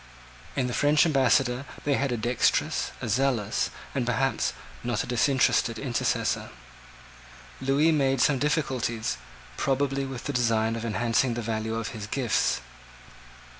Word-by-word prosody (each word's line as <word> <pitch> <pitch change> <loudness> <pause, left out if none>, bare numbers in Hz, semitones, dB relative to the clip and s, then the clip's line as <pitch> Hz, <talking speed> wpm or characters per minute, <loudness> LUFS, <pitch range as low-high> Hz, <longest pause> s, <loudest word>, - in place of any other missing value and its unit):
In 130 - +1
the 125 - -3
French 150 +4 +4
ambassador 130 -3 +2 0.2
they 145 - +1
had 140 -1 0
a 120 - 0
dexterous, 120 +2 +1
a - - -2
zealous, 115 -2 +1 0.2
and 130 - 0
perhaps, 125 0 0 0.3
not 120 -3 -1
a - - -6
disinterested 125 -1 +2
intercessor. 125 -4 -1 1.1
Lewis 140 +5 +3
made 135 -3 +2
some 135 +2 +3
difficulties, 130 -6 -1 0.4
probably 135 0 0
with 130 -2 -6
the 145 - -3
design 115 -2 +1
of 115 0 -4
enhancing 115 +2 +1
the 120 - -3
value 110 0 -2
of 115 -1 -3
his 105 -2 -7
gifts. 115 - +1
125 Hz, 135 wpm, -27 LUFS, 115-135 Hz, 1.1 s, French